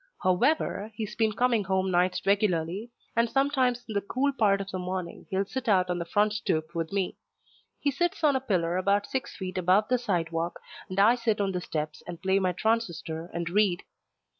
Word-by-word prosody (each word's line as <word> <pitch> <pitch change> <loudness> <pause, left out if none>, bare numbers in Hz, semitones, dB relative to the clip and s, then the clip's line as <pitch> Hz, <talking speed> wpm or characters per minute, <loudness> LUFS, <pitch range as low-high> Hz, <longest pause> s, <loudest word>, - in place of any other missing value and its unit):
However, 210 - +1
he's 215 -1 -5
been 220 -2 +2
coming 235 -3 +2
home 190 0 +1
nights 180 +1 +1
regularly, 200 +1 +1 0.3
and 230 0 +3
sometimes 260 -2 +1
in 220 - -5
the 200 - +1
cool 260 +7 0
part 205 -6 +3
of 195 0 -5
the 185 - -3
morning 180 -1 -5
he'll 195 0 0
sit 250 +3 -4
out 185 -3 +3
on 175 - -1
the 170 - -3
front 205 +4 +2
stoop 160 -6 -1
with 165 -1 -3
me. 195 -2 -1 0.6
He 285 - +1
sits 345 +4 -1
on 290 -3 +4
a - - +2
pillar 180 -7 0
about 200 +2 +2
six 265 - -4
feet 185 -2 -4
above 185 +4 +3
the 250 -1 +3
sidewalk, 170 -6 -1 0.3
and 185 +1 -2
I 215 +4 +7
sit 230 -3 0
on 200 -1 +1
the 180 -1 -2
steps 155 -2 -4
and 170 -2 -6
play 190 +1 +2
my 185 -1 +1
transistor 175 -6 -1
and 170 -1 -3
read. 195 -2 +2
195 Hz, 200 wpm, -28 LUFS, 180-230 Hz, 0.6 s, I